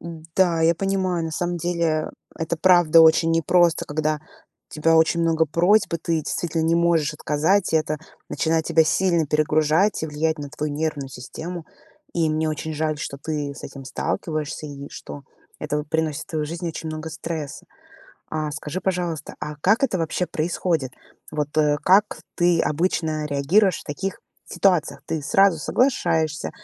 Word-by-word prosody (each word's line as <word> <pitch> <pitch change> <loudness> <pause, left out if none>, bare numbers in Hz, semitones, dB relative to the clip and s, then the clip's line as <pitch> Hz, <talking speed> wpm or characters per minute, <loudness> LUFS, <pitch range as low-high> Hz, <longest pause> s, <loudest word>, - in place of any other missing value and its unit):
М-да, 165 +1 -1
я 165 +1 +4
понимаю, 185 -2 -1
на 160 - -3
самом 175 +2 -2
деле, 170 -2 0 0.3
это 165 +1 -2
правда 175 -2 +6
очень 160 0 +5
непросто, 165 +1 +3
когда 155 0 -1 0.5
у - - -11
тебя 165 +2 +3
очень 160 +1 +3
много 165 -1 +2
просьб 175 +7 +3
и - - -1
ты 170 - -3
действительно 165 +1 -2
не 165 +1 +2
можешь 170 -3 +2
отказать, 160 +5 +1
и - - +5
это 155 -1 -1 0.3
начинает 160 0 0
тебя 165 -1 +4
сильно 170 -1 +2
перегружать 155 +6 +2
и - - -1
влиять 155 +1 -1
на 145 -1 -6
твою 150 0 -4
нервную 150 -2 -2
систему. 160 +7 -7 0.5
И 165 -2 +1
мне 155 +1 0
очень 155 +1 -4
жаль, 155 0 -1
что 140 - -5
ты 145 -3 -3
с - - -11
этим 135 -1 -9
сталкиваешься, 155 +3 -3
и 140 -1 -8
что 145 - -9 0.4
это 150 -1 -2
вот 150 0 -6
приносит 160 -2 -1
в - - -42
твою 155 -2 -2
жизнь 170 +2 -5
очень 160 0 -6
много 155 +1 -5
стресса. 155 -2 -6 0.6
А, 155 -1 -2
скажи, 150 +4 -5
пожалуйста, 175 -5 -2
а 150 0 -6
как 215 - +3
это 190 -9 0
вообще 165 +2 -1
происходит? 160 -4 -1 0.4
Вот, 150 0 -3
э, 150 -1 +3
как 195 +5 +4 0.2
ты 175 -1 +3
обычно 155 -1 0
реагируешь 160 +7 +2
в - - -14
таких 190 +6 -4 0.3
ситуациях? 180 -6 +1
Ты 160 -2 -3
сразу 190 +3 +4
соглашаешься 165 - 0
160 Hz, 165 wpm, -23 LUFS, 150-170 Hz, 0.6 s, правда